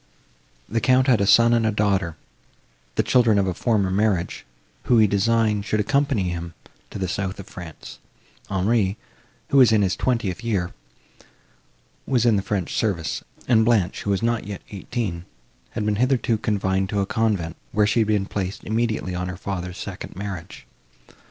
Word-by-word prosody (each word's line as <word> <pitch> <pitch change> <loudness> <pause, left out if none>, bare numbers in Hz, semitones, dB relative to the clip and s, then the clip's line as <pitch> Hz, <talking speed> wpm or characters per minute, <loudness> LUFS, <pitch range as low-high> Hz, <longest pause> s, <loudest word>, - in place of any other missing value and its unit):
The 115 0 -1
Count 130 +2 +4
had 125 -6 +3
a 100 - +2
son 115 +4 +6
and 115 -1 +3
a 110 - +2
daughter, 95 -6 0 0.8
the - - +2
children 115 -4 +4
of 100 - +3
a 95 - -1
former 100 -1 +1
marriage, 95 - 0 0.4
who, 120 - +4
he 110 - +6
designed, 105 +1 +2
should 105 +1 -1
accompany 120 0 +1
him 85 -1 -5 0.3
to - - -7
the 95 -1 -2
south 95 +2 -3
of 100 - -7
France; 90 -6 -10 0.5
Henri, 100 +1 +1 0.5
who 140 - +3
was 125 -4 +7
in 105 -2 +4
his 95 -1 +1
twentieth 115 -6 -1
year, 100 -7 -1 1.3
was 125 -3 +2
in 115 -3 +5
the 100 - +1
French 100 -3 -2
service; 90 -9 -1 0.2
and 115 -3 +5
Blanche, 110 -6 +1
who - - -4
was 100 +2 0
not 115 -3 0
yet 100 -2 -6
eighteen, 100 -4 -4 0.5
had 105 - -2
been 105 -1 +1
hitherto 125 -2 +1
confined 95 -3 0
to 105 - -4
the 100 -1 +1
convent, 100 -7 -1 0.2
where 105 0 +3
she 110 +3 +2
had 110 - +2
been 105 -2 +1
placed 95 -1 -4
immediately 110 -4 -1
on 90 0 -3
her 90 - -6
father's 90 -2 -5
second - - -7
marriage. 95 -3 -7
105 Hz, 175 wpm, -23 LUFS, 95-115 Hz, 1.3 s, was